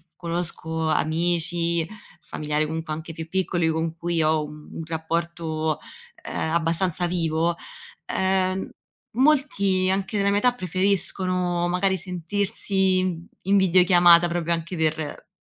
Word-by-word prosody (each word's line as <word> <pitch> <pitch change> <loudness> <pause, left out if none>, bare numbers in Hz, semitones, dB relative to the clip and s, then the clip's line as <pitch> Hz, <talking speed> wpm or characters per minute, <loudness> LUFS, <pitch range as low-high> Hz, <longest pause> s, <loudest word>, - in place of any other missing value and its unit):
conosco 165 -2 -3
amici, 170 +1 +1 0.3
familiari, 150 0 -1
comunque 160 0 -4
anche 160 +2 -7
più 160 0 -7
piccoli 175 -1 0
con 160 0 -2
cui 170 -1 -1
ho 155 0 +2
un 150 0 -12
un 165 - -6
rapporto, 160 -1 -2 0.5
ehm, 160 - -2
abbastanza 170 +1 +1
vivo, 170 -1 0 0.5
ehm, 190 0 0 0.5
molti 225 -9 +2
anche 195 +2 -2
della 200 0 +2
mia 200 0 +2
età, 250 +3 +3
preferiscono 185 -3 0
magari 190 +2 +1
sentirsi 190 +1 0 0.4
in 200 +2 +2
videochiamata 175 -2 +6
proprio 170 -1 -1
anche 165 +2 -4
per 155 -1 -2
170 Hz, 115 wpm, -24 LUFS, 160-185 Hz, 0.5 s, videochiamata